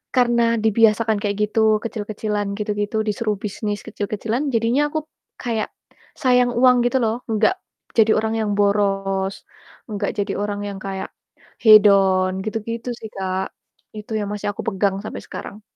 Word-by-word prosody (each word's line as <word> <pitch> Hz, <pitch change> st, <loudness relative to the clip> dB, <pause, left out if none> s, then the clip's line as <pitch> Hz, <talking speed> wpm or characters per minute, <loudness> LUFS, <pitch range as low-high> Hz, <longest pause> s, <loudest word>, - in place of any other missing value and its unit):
karena 235 Hz, -2 st, +3 dB
dibiasakan 220 Hz, 0 st, +3 dB
kayak 205 Hz, -1 st, -1 dB
gitu, 220 Hz, -1 st, +3 dB
kecil-kecilan 210 Hz, -2 st, -3 dB
gitu 210 Hz, 0 st, -2 dB
gitu, 205 Hz, +2 st, -2 dB
disuruh 210 Hz, 0 st, -1 dB
bisnis 210 Hz, 0 st, -4 dB
kecil-kecilan, 220 Hz, +6 st, -2 dB
jadinya 240 Hz, +6 st, +2 dB
aku 310 Hz, 0 st, -3 dB, 0.3 s
kayak 230 Hz, -3 st, -2 dB, 0.5 s
sayang 250 Hz, -2 st, +3 dB
uang 250 Hz, 0 st, +4 dB
gitu 265 Hz, +2 st, +2 dB
loh, 225 Hz, +3 st, -1 dB
enggak 220 Hz, -, +3 dB, 0.4 s
jadi 220 Hz, 0 st, +5 dB
orang 220 Hz, +1 st, 0 dB
yang 210 Hz, -2 st, 0 dB
boros, 195 Hz, -1 st, 0 dB, 0.4 s
enggak 205 Hz, -1 st, -2 dB
jadi 200 Hz, 0 st, -1 dB
orang 205 Hz, 0 st, -2 dB
yang 200 Hz, -, -5 dB
kayak 195 Hz, -1 st, -4 dB, 0.5 s
hedon, 195 Hz, -3 st, +6 dB
gitu 215 Hz, +1 st, -2 dB
gitu 230 Hz, +2 st, -4 dB
sih, 220 Hz, -, -7 dB
Kak. 190 Hz, 0 st, -3 dB, 0.4 s
Itu 215 Hz, +1 st, -7 dB
yang 205 Hz, -, -2 dB
masih 205 Hz, 0 st, -2 dB
aku -, -, -26 dB
pegang 195 Hz, -1 st, 0 dB
sampai -, -, -6 dB
sekarang. 210 Hz, +1 st, -8 dB
215 Hz, 150 wpm, -21 LUFS, 200-230 Hz, 0.5 s, hedon